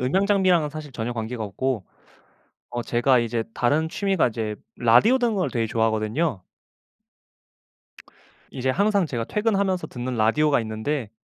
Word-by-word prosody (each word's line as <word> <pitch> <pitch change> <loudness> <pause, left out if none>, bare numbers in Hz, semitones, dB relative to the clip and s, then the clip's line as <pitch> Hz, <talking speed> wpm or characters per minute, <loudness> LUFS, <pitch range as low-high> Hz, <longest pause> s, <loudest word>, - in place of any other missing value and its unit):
음향 185 +11 +1
장비랑은 185 -6 +3
사실 155 -1 -8
전혀 120 0 -3
관계가 115 0 -4
없고 115 0 -2 0.9
어 120 - -3
제가 120 +2 +2
이제 115 0 -1
다른 150 +6 +1
취미가 195 -5 +1
이제 110 -2 -4 0.2
라디오 120 - +5
듣는 235 -3 +1
걸 185 - 0
되게 115 -3 -1
좋아하거든요. 110 - 0 2.1
이제 130 0 -1
항상 200 +3 +2
제가 120 -6 -3
퇴근하면서 200 - 0
듣는 125 0 -5
라디오가 140 +6 +3
있는데 110 +2 -3
130 Hz, 325 characters per minute, -24 LUFS, 115-180 Hz, 2.1 s, 라디오